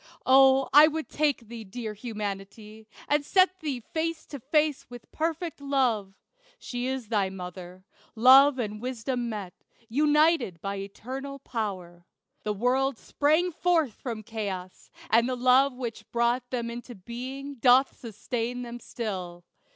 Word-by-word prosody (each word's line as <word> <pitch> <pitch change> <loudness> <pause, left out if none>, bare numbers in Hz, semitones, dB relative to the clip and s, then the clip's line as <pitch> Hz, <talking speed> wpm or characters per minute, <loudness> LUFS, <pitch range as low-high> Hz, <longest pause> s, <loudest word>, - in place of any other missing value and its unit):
O, 265 0 +6
I 295 +2 +9
would 315 0 -4
take 295 -4 +1
thee, 230 0 -9
dear 215 +2 -6
Humanity, 210 0 -7 0.2
And 295 0 +2
set 370 +4 +3
thee 280 -6 -3
face 325 +4 -3
to 285 - -8
face 300 +3 0
with 245 -1 -12
perfect 325 0 -3
Love. 245 -9 0 0.4
She 245 - -4
is 260 -4 -4
thy 205 -4 +1
mother. 180 0 -9 0.3
Love 265 +4 +7
and 210 -3 -4
Wisdom 245 0 -3
met 200 -5 -6 0.4
United 295 - +3
by 200 +3 -4
Eternal 260 +8 -7
Power. 185 -9 -5 0.3
The 210 - -2
worlds 260 +6 0
Sprang 315 +5 +1
forth 325 -7 +1
from 225 -3 -6
chaos; 200 -5 -6 0.2
and 230 +2 +4
the 255 - -1
love 255 +2 +4
which 240 -3 -7
brought 240 +1 0
Them 235 -2 -3
into 240 +1 -8
being 260 +7 -7
doth 255 +3 +4
sustain 235 +2 -4
them 240 0 -7
still. 185 -8 -6
245 Hz, 140 wpm, -27 LUFS, 215-275 Hz, 0.4 s, I